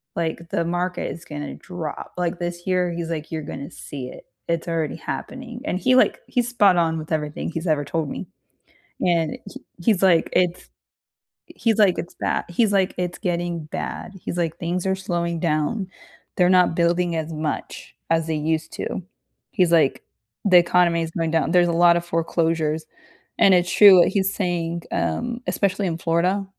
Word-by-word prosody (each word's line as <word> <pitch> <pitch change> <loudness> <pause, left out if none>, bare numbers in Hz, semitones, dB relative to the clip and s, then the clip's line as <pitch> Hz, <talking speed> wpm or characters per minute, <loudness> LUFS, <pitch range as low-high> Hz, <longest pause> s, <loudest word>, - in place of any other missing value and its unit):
like, 165 0 -3
the 170 - 0
market 175 +1 -2
is 165 - -9
gonna 145 -1 -6
drop," 175 -5 -7
like, 180 0 -1
this 175 0 -4
year 180 -1 +1
he's, 170 -1 -4
like, 155 -2 -5
"You're 160 -1 -3
gonna 140 -1 -7
see 135 -3 -8
it, - - -11 0.2
it's 170 0 -1
already 165 -3 -1
happening," 250 -2 -6
and 185 - -1
he, 255 +7 +2
like 255 - +4
he's 245 -1 0
spot 205 -7 +4
on 165 -1 +2
with 155 0 -7
everything 150 -1 -2
he's 165 +2 -4
ever 150 -2 +1
told 155 0 -2
me, - - -5 0.8
and 170 -3 +1
he - - -11 0.2
he's, 205 -1 +3
like, 180 -4 +4
"It's" 180 -1 0 0.8
he - - -16 0.2
he's 220 - -1
like, 195 -4 +5
"It's 170 - -5
bad" - - -1
he's, 210 +4 +2
like, 195 -2 +2
"It's 180 0 -2
getting 175 -3 -2
bad," 155 - -5
he's, 175 - -4
like, 165 -1 -1
"Things 175 +2 -2
are 190 - +2
slowing 170 -3 -2
down, 165 +5 0 0.5
they're 180 - +5
not 180 -2 +4
building 170 0 +1
as 160 0 -3
much 155 -1 -5 0.2
as 165 -1 +2
they 160 - -1
used 155 +1 -1
to." - - -4 0.5
He's, 180 -2 +2
like, 155 -5 +3 0.4
"The 185 -3 +7
economy 175 -1 +4
is 165 - -2
going 165 -2 -1
down, 160 -1 +1
there's 180 -1 +5
a - - +2
lot 170 0 +5
of 170 - -4
foreclosures." 165 -2 0 0.5
And 195 - +6
it's 180 0 +1
true 200 -3 +8
what 175 - +5
he's 195 -1 +1
saying, 170 -3 -2
um, 240 0 -1
especially 200 0 0
in 165 -2 -2
Florida, 175 +4 +1
170 Hz, 185 wpm, -23 LUFS, 165-180 Hz, 0.8 s, true